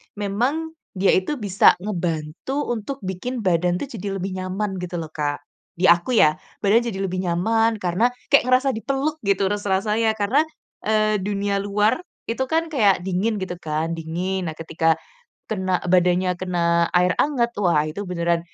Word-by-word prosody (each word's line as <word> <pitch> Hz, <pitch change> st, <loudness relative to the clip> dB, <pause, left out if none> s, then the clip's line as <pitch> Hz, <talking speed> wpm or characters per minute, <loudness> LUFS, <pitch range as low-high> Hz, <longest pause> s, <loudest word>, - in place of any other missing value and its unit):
memang 245 Hz, +11 st, -1 dB, 0.2 s
dia 190 Hz, +1 st, +3 dB
itu 190 Hz, +11 st, 0 dB
bisa 200 Hz, -2 st, +4 dB
ngebantu 180 Hz, -, -3 dB
untuk 240 Hz, +4 st, -4 dB
bikin 190 Hz, +7 st, -4 dB
badan 175 Hz, -1 st, +2 dB
tuh 280 Hz, -, -4 dB
jadi 200 Hz, -3 st, -4 dB
lebih 190 Hz, +1 st, -3 dB
nyaman 190 Hz, +2 st, -3 dB
gitu 180 Hz, 0 st, -5 dB
loh, 160 Hz, -2 st, -6 dB
Kak. 145 Hz, -2 st, -3 dB, 0.3 s
Di 180 Hz, +2 st, +2 dB
aku 175 Hz, +9 st, +2 dB
ya, 155 Hz, -7 st, +5 dB, 0.3 s
badan 215 Hz, +4 st, +4 dB
jadi 195 Hz, -4 st, -4 dB
lebih 185 Hz, -1 st, -2 dB
nyaman 225 Hz, +6 st, +2 dB
karena 185 Hz, +6 st, +2 dB, 0.2 s
kayak 280 Hz, -, +6 dB
ngerasa 255 Hz, +2 st, +3 dB
dipeluk 275 Hz, +6 st, -2 dB
gitu 200 Hz, 0 st, +2 dB
rasa 205 Hz, -2 st, 0 dB
rasanya 220 Hz, +1 st, +2 dB
karena, 225 Hz, +9 st, +2 dB, 0.4 s
eee, 215 Hz, -1 st, +2 dB
dunia 200 Hz, 0 st, -1 dB
luar 210 Hz, +5 st, +2 dB, 0.3 s
itu 260 Hz, +3 st, -1 dB
kan 325 Hz, +3 st, +1 dB
kayak 205 Hz, -, +3 dB
dingin 195 Hz, +4 st, 0 dB
gitu 180 Hz, -1 st, -5 dB
kan, 155 Hz, 0 st, -2 dB
dingin. 175 Hz, +3 st, -3 dB
Nah 160 Hz, -, -4 dB
ketika 165 Hz, 0 st, +1 dB, 0.6 s
kena 185 Hz, -3 st, 0 dB
badannya 180 Hz, 0 st, +3 dB
kena 170 Hz, -2 st, +1 dB
air 180 Hz, +1 st, +4 dB
hangat 250 Hz, -5 st, +1 dB
wah 170 Hz, -6 st, +3 dB
itu 185 Hz, +6 st, -5 dB
beneran 170 Hz, -1 st, 0 dB
190 Hz, 160 wpm, -22 LUFS, 175-220 Hz, 0.6 s, kayak